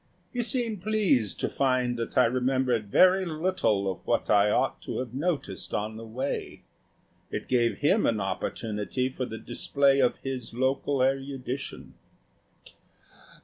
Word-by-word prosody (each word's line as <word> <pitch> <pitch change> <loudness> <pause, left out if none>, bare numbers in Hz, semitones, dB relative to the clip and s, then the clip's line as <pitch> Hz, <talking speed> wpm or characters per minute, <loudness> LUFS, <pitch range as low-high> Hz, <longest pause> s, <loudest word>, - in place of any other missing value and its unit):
He 245 - 0
seemed 235 -4 -1
pleased 195 - +1
to - - +1
find 130 -2 +1
that 115 - -4
I 130 - +7
remembered 125 -3 +1
very 185 - +5
little 155 - 0
of 95 -2 -2
what - - +1
I 105 0 +5
ought - - +1
to - - -5
have 125 -2 -4
noticed 145 - -3
on 105 +1 -2
the 115 +1 -8
way. 130 +5 -4 0.7
It - - -5
gave 120 -2 +2
him 190 +9 +3
an 110 -2 +1
opportunity 105 +5 -2
for 130 0 -4
the 110 - -6
display 140 +4 +1
of 125 -2 +3
his 130 -4 -5
local 130 +1 +1
erudition. 135 0 -3
130 Hz, 145 wpm, -27 LUFS, 115-140 Hz, 0.7 s, I